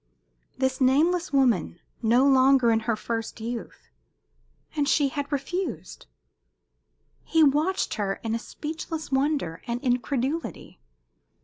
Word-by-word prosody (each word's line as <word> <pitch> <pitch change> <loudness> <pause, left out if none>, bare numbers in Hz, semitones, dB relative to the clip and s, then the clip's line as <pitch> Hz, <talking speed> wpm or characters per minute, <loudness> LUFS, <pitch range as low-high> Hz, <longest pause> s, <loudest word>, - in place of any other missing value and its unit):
This 260 0 -1
nameless 325 +7 +3
woman 240 - +2 0.2
no 235 +4 +4
longer 265 -2 +5
in 225 - +3
her 230 - +3
first 225 +1 -4
youth. 230 - -7 0.8
And 290 -2 +1
she 285 -3 +3
had 285 +1 -4
refused? 340 +7 -4 1.2
He 325 -1 +3
watched 305 +6 +2
her 200 -3 -1
in 225 -1 -2
a 230 - -1
speechless 315 +3 -6
wonder 270 - 0
and 235 0 -2
incredulity. 255 - -2
265 Hz, 115 wpm, -26 LUFS, 235-295 Hz, 1.2 s, longer